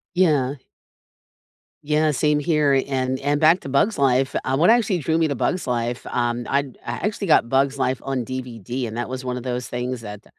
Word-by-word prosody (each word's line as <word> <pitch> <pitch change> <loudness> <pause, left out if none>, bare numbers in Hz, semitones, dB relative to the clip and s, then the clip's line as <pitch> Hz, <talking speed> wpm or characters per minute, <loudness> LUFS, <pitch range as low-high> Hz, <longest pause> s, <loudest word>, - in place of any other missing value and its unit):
Yeah. 145 -7 +2 1.3
Yeah, 150 +1 +2
same 150 +1 +1
here, 145 -3 +2
and 130 -1 -1
and 145 +2 0
back 165 +4 +5
to - - -8
Bug's 185 +10 +1
Life, 135 0 +2
uh, 135 +1 0
what 165 +5 +4
actually 225 -5 +3
drew 160 +2 0
me 165 -1 +2
to 140 - -2
Bug's 180 +9 -1
Life, 120 -1 -2
um, 120 0 -1
I 140 - +3 0.2
I 120 - -3
actually 205 -3 -3
got 115 - +4
Bug's 135 +1 +1
Life 130 -2 0
on 135 -3 -2
DVD 125 -1 -5
and 110 - -7
that 120 - -3
was 130 0 -5
one 125 -1 -3
of 125 - -6
those 125 -1 -3
things 125 0 -3
that 105 -2 -9
135 Hz, 200 wpm, -22 LUFS, 125-150 Hz, 1.3 s, back